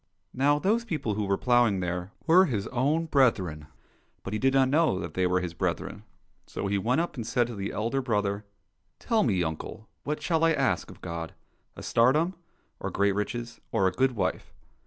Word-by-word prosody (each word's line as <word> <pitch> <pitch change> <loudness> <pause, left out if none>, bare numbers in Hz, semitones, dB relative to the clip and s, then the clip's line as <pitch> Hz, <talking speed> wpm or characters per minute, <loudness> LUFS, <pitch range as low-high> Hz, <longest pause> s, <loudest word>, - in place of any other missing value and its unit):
Now 145 +3 +3
those 215 +9 +1
people 155 - -2
who 105 0 -1
were 100 0 +1
ploughing 120 -5 +3
there 90 +1 -3
were 180 +4 +6
his 110 - -2
own 145 +6 +1
brethren, 95 - +1 0.6
but 100 - -5
he 110 - -1
did 135 +3 +3
not 135 -1 +3
know 155 - +3
that 85 -3 -5
they 95 -1 +1
were 90 0 +1
his 90 -2 -4
brethren. 95 +4 -3 0.4
So - - -5
he 100 0 0
went 125 +10 +1
up 175 - -4
and 115 -2 -4
said 120 +1 +2
to 120 -1 -7
the 100 -1 -4
elder 115 +6 -1
brother, 105 -4 -1 0.3
" 85 +2 -50
Tell 230 -3 +1
me, 95 -7 +2
uncle, 80 +7 -5 0.2
what 150 +1 -2
shall 160 +1 0
I 165 0 +5
ask - - 0
of - - -13
God? 85 -1 -6 0.4
A - - -9
tsardom, 150 +10 +3 0.5
or - - -3
great 100 0 +2
riches, 115 +4 -4
or 95 - +2
a - - +1
good 130 +6 +1
wife 105 - -2
115 Hz, 200 wpm, -27 LUFS, 95-135 Hz, 0.6 s, were